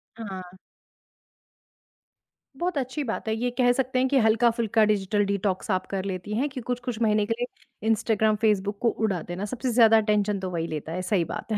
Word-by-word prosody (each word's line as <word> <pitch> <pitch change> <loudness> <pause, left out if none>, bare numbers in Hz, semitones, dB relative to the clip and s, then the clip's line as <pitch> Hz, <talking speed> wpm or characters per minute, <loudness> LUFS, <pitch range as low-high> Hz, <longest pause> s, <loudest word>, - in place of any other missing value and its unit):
हाँ। 190 -5 -8 2.0
बहुत 345 +3 -2
अच्छी 270 +2 -2
बात 225 -3 -4
है, 220 - +1
ये 245 +2 -1
कह 245 -1 +4
सकते 255 0 0
हैं 260 - +3
कि 280 - +3
हल्का-फुल्का 225 -1 +3
डिजिटल 205 0 +1
डिटॉक्स 200 0 -1
आप 185 -1 0
कर 195 -1 -3
लेती 190 +1 -4
हैं 275 +5 +1
कि 260 -1 -6
कुछ-कुछ 245 -2 -3
महीने 210 -2 +3
के 230 - 0
लिए 245 -2 -7
इंस्टाग्राम, 220 -1 +2
फेसबुक 205 -2 +1
को 240 - +3
उड़ा 210 -6 -1
देना 175 +4 -5
सबसे 250 +4 -3
ज़्यादा 225 -1 +6
अटेंशन 210 -2 +1
तो 185 -1 -4
वही 165 -2 -2
लेता 155 0 -5
है, 180 +2 -3
सही 185 -1 +1
बात 195 - -6
है। 215 - +1
215 Hz, 190 wpm, -26 LUFS, 195-240 Hz, 2.0 s, ज़्यादा